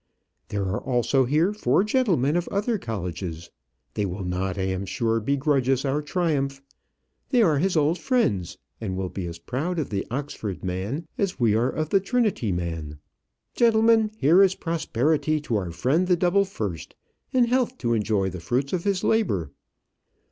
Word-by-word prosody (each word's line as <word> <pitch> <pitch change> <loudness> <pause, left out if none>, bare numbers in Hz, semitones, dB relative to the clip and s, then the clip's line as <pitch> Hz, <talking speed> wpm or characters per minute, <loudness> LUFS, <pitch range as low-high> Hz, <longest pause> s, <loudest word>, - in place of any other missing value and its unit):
There 100 -1 -2
are 95 +1 -2
also 130 +1 +2
here 155 +10 +2
four 210 -2 +2
gentlemen 195 - +2
of 175 0 0
other 210 +2 -1
colleges; 90 - -5 0.4
they 105 - -1
will 95 0 -3
not, 90 +1 -2
I 95 - -1
am 95 0 -2
sure, 115 +3 0
begrudge 135 +2 +1
us 135 +1 +2
our 140 +2 0
triumph; 145 -4 -1 0.7
they 245 -4 +4
are 155 -7 +3
his 180 +1 +1
old 155 +4 +2
friends, 170 - 0 0.2
and 95 -4 -3
will 95 -1 -2
be 90 -2 -5
as 85 0 -6
proud 140 - -3
of 155 -7 -2
the 100 -2 -2
Oxford 120 -7 -4
man 100 - -3
as 195 -6 -1
we 115 -4 +3
are 115 +4 +2
of 155 +1 -3
the 195 - +4
Trinity 205 - 0
man. 80 -4 -4 0.6
Gentlemen, 225 -1 +4
here 170 +1 +5
is 190 -1 +4
prosperity 155 -1 0
to 120 -6 -2
our 95 -4 -1
friend 130 - +1
the 180 -1 +3
double 185 +3 +3
first, 105 - -5 0.4
and 250 -2 +3
health 250 +1 +1
to 120 -3 0
enjoy 105 -3 0
the 90 - -6
fruits 130 +9 -1
of 180 0 -1
his 195 -2 0
labour." 100 - +1
135 Hz, 175 wpm, -25 LUFS, -, 0.7 s, here